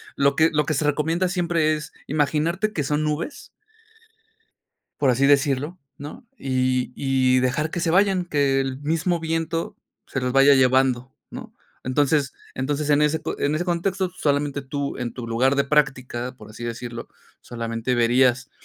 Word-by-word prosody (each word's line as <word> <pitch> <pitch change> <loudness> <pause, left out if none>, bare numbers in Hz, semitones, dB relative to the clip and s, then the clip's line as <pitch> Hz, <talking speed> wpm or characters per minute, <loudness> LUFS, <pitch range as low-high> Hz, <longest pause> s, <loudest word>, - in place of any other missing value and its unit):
lo 140 0 +2
que 160 +1 +4
lo 150 -1 +1
que 155 - -1
se 150 +2 0
recomienda 160 +5 +1
siempre 170 -4 +1
es 150 0 -7 0.2
imaginarte 160 +8 0
que 150 - -1
son 150 +2 0
nubes 150 - -4 1.5
por 135 -3 +3
así 135 +3 +2
decirlo, 145 +4 +2 0.2
¿no? 150 +9 -10
Y, 130 -1 -1
y 130 -2 +2
dejar 150 +5 0
que - - -4
se 165 - 0
vayan, 190 -1 +3
que 140 -3 +1
el 135 0 -3
mismo 165 +3 0
viento 165 0 -2 0.3
se 135 - -3
las 125 0 -1
vaya 135 +1 +6
llevando, 130 -1 +2 0.2
¿no? - - -9 0.3
Entonces, 140 +1 +1 0.2
entonces 145 +3 -2
en 145 +1 +4
ese 150 +1 +1
co - - -4
en 145 +2 0
ese 170 - -1
contexto, 185 +1 -1
solamente 145 -1 0
tú, 140 +1 -4
en 120 -2 -4
tu 120 -2 -6
lugar 130 +4 +2
de 140 - +3
práctica, 130 -4 0
por - - -13
así 115 +2 -9
decirlo, 120 0 -6 0.3
solamente 115 +1 -3
verías, 125 +2 +2
145 Hz, 165 wpm, -23 LUFS, 130-155 Hz, 1.5 s, vaya